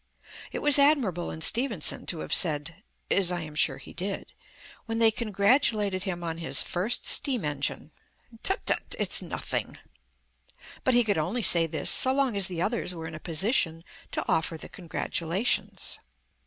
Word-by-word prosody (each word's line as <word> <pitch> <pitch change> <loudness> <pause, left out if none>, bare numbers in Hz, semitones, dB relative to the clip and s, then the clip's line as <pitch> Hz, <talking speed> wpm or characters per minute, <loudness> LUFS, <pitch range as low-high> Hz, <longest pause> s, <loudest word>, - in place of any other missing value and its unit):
It - - -5
was 295 -1 +6
admirable 260 - +2
in 160 - -7
Stephenson 225 - +2
to 165 - -3
have - - -3
said 160 +2 +3 0.3
(as 190 -3 +2
I 175 -1 -2
am 155 -1 -8
sure 150 - +2
he - - -12
did), 195 +2 -5 0.5
when 225 0 -3
they 225 -1 +4
congratulated 210 -2 +1
him 175 -3 -4
on 165 -1 -4
his 165 - +1
first 195 +7 -2
steam 250 - +2
engine, 145 +1 -3 0.5
"Tut 385 - 0
tut, - - +3
it's - - +2
nothing"; - - -2 1.1
but 260 - +2
he 245 - +5
could 205 -6 0
only 205 +10 -2
say 170 -3 +4
this - - -1
so 260 - +4
long 270 -5 +1
as 195 -2 0
the 175 -2 -3
others 210 -5 -1
were 165 -1 -7
in 160 - -7
a 155 - -7
position 165 -1 -1 0.3
to - - -2
offer 160 0 0
the - - -10
congratulations. 175 +3 -2
185 Hz, 170 wpm, -27 LUFS, 165-230 Hz, 1.1 s, was